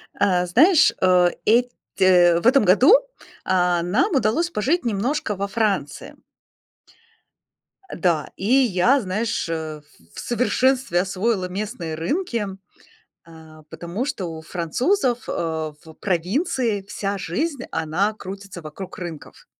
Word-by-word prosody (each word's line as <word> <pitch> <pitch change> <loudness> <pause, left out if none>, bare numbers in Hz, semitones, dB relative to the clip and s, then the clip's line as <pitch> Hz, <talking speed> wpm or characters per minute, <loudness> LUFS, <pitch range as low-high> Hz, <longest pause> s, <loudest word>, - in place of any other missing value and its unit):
Э, 180 -2 +2
знаешь, 310 - +5
э, 180 -1 +4 0.2
эт 245 +3 +3 0.3
э, 175 -2 +5
в 200 - 0
этом 265 -1 +5
году, 245 - +6 0.5
а, 180 -2 +1
нам 255 - +1
удалось 265 +8 +1
пожить 295 +10 0
немножко 230 +1 -1
во 200 +1 -3
Франции. 200 -8 -2 1.8
Да, 170 -5 0
и 195 - -7
я, 250 0 +3
знаешь, 215 +2 -2
э, 160 -2 -4
в 85 - -26
в - - -7
совершенстве 250 -3 +1
освоила 190 +1 -1
местные 185 -3 -5
рынки, 230 - -2 0.8
э, - - -15 0.4
потому 170 +8 -5
что 275 -10 -4
у 160 -2 -7
французов, 240 - -1
э, - - -1
в 160 -1 -4
провинции 210 - -1
вся 200 -1 -3
жизнь, 265 - -3
она 180 +7 0
крутится 195 -3 -9
вокруг 160 +4 -9
рынков. 170 -4 -9
195 Hz, 120 wpm, -22 LUFS, 175-245 Hz, 1.8 s, году